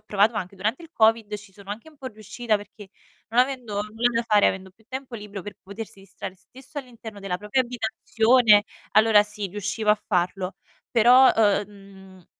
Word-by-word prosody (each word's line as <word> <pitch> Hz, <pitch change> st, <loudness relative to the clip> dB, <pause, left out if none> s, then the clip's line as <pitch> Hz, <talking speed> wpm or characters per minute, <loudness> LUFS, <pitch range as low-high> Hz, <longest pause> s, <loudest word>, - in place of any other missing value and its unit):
provato 210 Hz, +3 st, +2 dB
anche 190 Hz, -1 st, -5 dB
durante 215 Hz, -, -2 dB
il 330 Hz, -, -13 dB
COVID, 220 Hz, -1 st, +2 dB
ci 205 Hz, -1 st, -10 dB
sono 200 Hz, 0 st, -16 dB
anche 225 Hz, +9 st, -7 dB
un 305 Hz, -, -23 dB
po' 265 Hz, -, -8 dB
riuscita, 220 Hz, 0 st, -2 dB
perché 205 Hz, 0 st, -12 dB, 0.4 s
non 235 Hz, +2 st, +4 dB
avendo 250 Hz, -4 st, -2 dB
nulla 225 Hz, +3 st, 0 dB
da 230 Hz, -, +1 dB
fare, 210 Hz, -3 st, +4 dB
avendo 190 Hz, 0 st, -2 dB
più 220 Hz, +4 st, -29 dB
tempo 260 Hz, -2 st, -7 dB
libro 205 Hz, -3 st, -8 dB
per 205 Hz, -1 st, -9 dB
potersi 200 Hz, 0 st, -9 dB
distrar 195 Hz, -1 st, -9 dB
stesso 265 Hz, -, -12 dB
all'interno 230 Hz, -5 st, -10 dB
della 195 Hz, -2 st, -3 dB
propria 210 Hz, +6 st, 0 dB
abitazione, 225 Hz, -2 st, +3 dB, 0.3 s
allora 215 Hz, -1 st, +6 dB
sì, 210 Hz, -1 st, -6 dB
riuscivo 210 Hz, +2 st, -1 dB
a 210 Hz, -, +4 dB
farlo. 185 Hz, 0 st, -1 dB, 0.4 s
Però, 245 Hz, +3 st, +6 dB
uh -, -, +4 dB, 0.3 s
uhm, -, -, -23 dB
mhmm, 195 Hz, -3 st, -16 dB
210 Hz, 185 wpm, -24 LUFS, 200-235 Hz, 0.4 s, allora